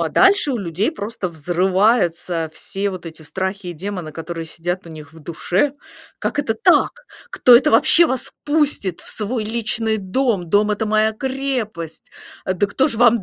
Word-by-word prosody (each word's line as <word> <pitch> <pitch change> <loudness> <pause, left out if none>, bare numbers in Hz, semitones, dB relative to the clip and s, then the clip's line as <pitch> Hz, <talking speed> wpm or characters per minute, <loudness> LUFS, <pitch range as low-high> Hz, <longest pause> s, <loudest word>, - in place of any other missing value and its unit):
а - - 0
дальше 385 -7 +4
у 240 - -1
людей 195 - -1
просто 205 - -4
взрываются 175 0 +1
все 195 +5 -3
вот 185 -2 -8
эти 160 -1 -9
страхи 190 +3 -4
и - - -4
демоны, 180 -2 -6
которые 165 0 -6
сидят 175 +3 -4
у - - -10
них 155 -1 -11
в 165 - -14
душе: 175 - -1 0.5
"Как - - -2
это 250 -6 0
так! 355 +10 +4 0.4
Кто 245 - +7
это - - +3
вообще 330 +8 +6
вас 260 -2 -2
пустит 290 - 0
в - - -7
свой 220 +2 -2
личный 220 0 0
дом? 200 -2 -1
Дом- 210 +3 +3
это 210 +1 -1
моя 215 +1 +2
крепость! 240 - -4 0.3
Да 185 +2 0
кто 265 +8 +1
же 230 - -2
вам 235 -3 +5
205 Hz, 170 wpm, -20 LUFS, 175-235 Hz, 0.5 s, Кто